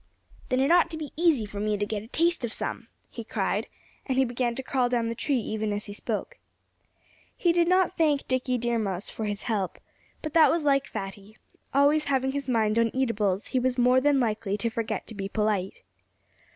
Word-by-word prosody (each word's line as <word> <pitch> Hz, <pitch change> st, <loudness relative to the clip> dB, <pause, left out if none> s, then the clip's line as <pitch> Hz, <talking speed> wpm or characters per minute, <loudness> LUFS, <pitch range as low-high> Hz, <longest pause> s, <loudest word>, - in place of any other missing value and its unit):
"Then 255 Hz, -1 st, +1 dB
it 275 Hz, +4 st, +3 dB
ought 345 Hz, -1 st, +5 dB
to 320 Hz, -, -5 dB
be 305 Hz, -2 st, -6 dB
easy 315 Hz, -9 st, +3 dB
for 200 Hz, 0 st, -7 dB
me 210 Hz, 0 st, 0 dB
to 205 Hz, -, -1 dB
get 205 Hz, 0 st, -3 dB
a 220 Hz, -, -12 dB
taste 335 Hz, +3 st, +1 dB
of 235 Hz, -, -2 dB
some," -, -, -3 dB, 0.2 s
he -, -, -7 dB
cried. -, -, -1 dB, 0.4 s
And 260 Hz, -2 st, 0 dB
he 265 Hz, -, +4 dB
began 240 Hz, -1 st, -1 dB
to 265 Hz, -, -4 dB
crawl 255 Hz, -2 st, +1 dB
down 235 Hz, -2 st, 0 dB
the -, -, -2 dB
tree 275 Hz, +4 st, 0 dB
even 215 Hz, -2 st, -2 dB
as 205 Hz, 0 st, -3 dB
he 205 Hz, -, -7 dB
spoke. 230 Hz, -, -4 dB, 1.0 s
He 345 Hz, -2 st, +3 dB
did 340 Hz, 0 st, +3 dB
not 370 Hz, 0 st, +2 dB
thank 295 Hz, -4 st, +2 dB
Dickie 255 Hz, 0 st, 0 dB
Deer 240 Hz, 0 st, 0 dB
Mouse 195 Hz, -2 st, -2 dB
for 220 Hz, -, -4 dB
his 205 Hz, 0 st, -3 dB
help. 205 Hz, -6 st, -2 dB, 0.5 s
But 310 Hz, -, -4 dB
that 325 Hz, -2 st, +7 dB
was 330 Hz, -1 st, +1 dB
like 275 Hz, -2 st, +2 dB
Fatty. 200 Hz, +2 st, -7 dB, 0.3 s
Always 285 Hz, +3 st, +3 dB
having 265 Hz, -1 st, +1 dB
his 280 Hz, -1 st, -4 dB
mind 220 Hz, -2 st, +2 dB
on 230 Hz, 0 st, +3 dB
eatables, 215 Hz, -7 st, 0 dB
he 255 Hz, -, +1 dB
was 255 Hz, 0 st, 0 dB
more 250 Hz, +1 st, +4 dB
than 285 Hz, 0 st, +3 dB
likely 215 Hz, -4 st, -1 dB
to 230 Hz, +3 st, -1 dB
forget 225 Hz, 0 st, -3 dB
to -, -, -9 dB
be 195 Hz, -2 st, -5 dB
polite. 210 Hz, -3 st, -1 dB
245 Hz, 215 wpm, -27 LUFS, 215-280 Hz, 1.0 s, that